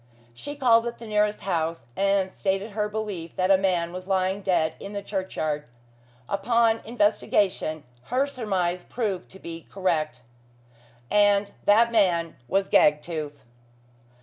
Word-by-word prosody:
She 290 - -7
called 240 -4 +4
at 235 - -5
the 230 - -10
nearest 210 -1 +1
house, 165 -7 -2
and 195 -1 +1
stated 195 +2 -1
her 210 0 -1
belief 205 -6 -5
that 185 +1 +2
a - - +8
man 175 -3 0
was 185 +1 -7
lying 190 0 0
dead 175 -5 +1
in 200 - -8
the 200 0 -4
churchyard. 155 -7 -3 0.6
Upon 230 +2 +2
investigation, 205 -7 +1 0.2
her 255 +3 +1
surmise 190 -10 -2
proved 205 -6 -3
to 190 - -12
be 165 -3 -9
correct. 155 -9 -1 0.9
And 205 -1 +4
that 230 +3 +5
man 175 -7 +2
was 195 +5 +1
Gagtooth. 150 -1 +1
195 Hz, 135 wpm, -25 LUFS, 170-210 Hz, 0.9 s, a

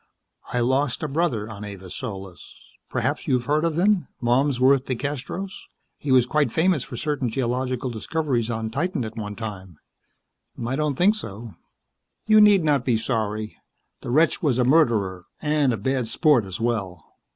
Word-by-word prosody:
I 125 - 0
lost 130 +3 0
a - - 0
brother 140 -8 -1
on 105 -2 -8
Avis 95 -3 -8
Solis. 95 -7 -8 0.3
Perhaps - - -2
you - - +3
have 120 -1 -1
heard 150 +3 +1
of 165 -2 0
him. 190 -3 +2
Malmsworth 130 +2 +3
DeCastros. 145 +8 -4 0.5
He 145 - -3
was 130 -2 +6
quite 150 +3 +1
famous 165 -4 +2
for 120 - -8
certain 145 -3 -1
geological 125 +1 -2
discoveries 120 0 -1
on 110 -1 -3
Titan 155 - -1
at 110 0 -7
one 105 -2 -5
time." 95 -7 -7 0.9
"I 125 +3 -1
don't 150 -1 0
think 190 +8 +4
so." 115 - -7 0.7
"You 215 0 +6
need 205 -4 +6
not 145 -3 +2
be 120 -3 +2
sorry. 110 -2 -2 0.4
The - - -6
wretch 155 +6 +3
was 140 -7 +1
a 125 - +3
murderer 110 - +2
and 150 -3 +2
a 115 - -1
bad 130 +3 -1
sport 145 - +3
as 95 -1 -6
well. 100 -8 -2
125 Hz, 165 wpm, -24 LUFS, 110-150 Hz, 0.9 s, was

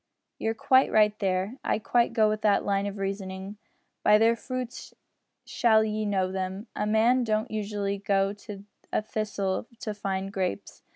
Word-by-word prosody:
"You're 225 0 -1
quite 260 +4 +4
right 210 -1 +5
there. 195 +5 -1
I - - +1
quite 235 +2 +1
go 220 -2 +3
with 215 0 -1
that 205 -2 +3
line 200 0 0
of 200 0 -5
reasoning. 195 0 -5 0.4
By 210 - +6
their 225 +2 +4
fruits 250 +1 -6 0.5
shall 220 -2 +3
ye 215 0 -2
know 190 -2 0
them. 190 +2 -4
A 210 - -1
man 230 +4 +3
don't 215 +1 -1
usually 205 -2 -2
go 195 0 +1
to 205 -1 -10 0.3
a - - 0
thistle 210 -2 -2
to 215 - -3
find 195 -1 -3
grapes. 185 - -3
210 Hz, 165 wpm, -27 LUFS, 195-220 Hz, 0.5 s, By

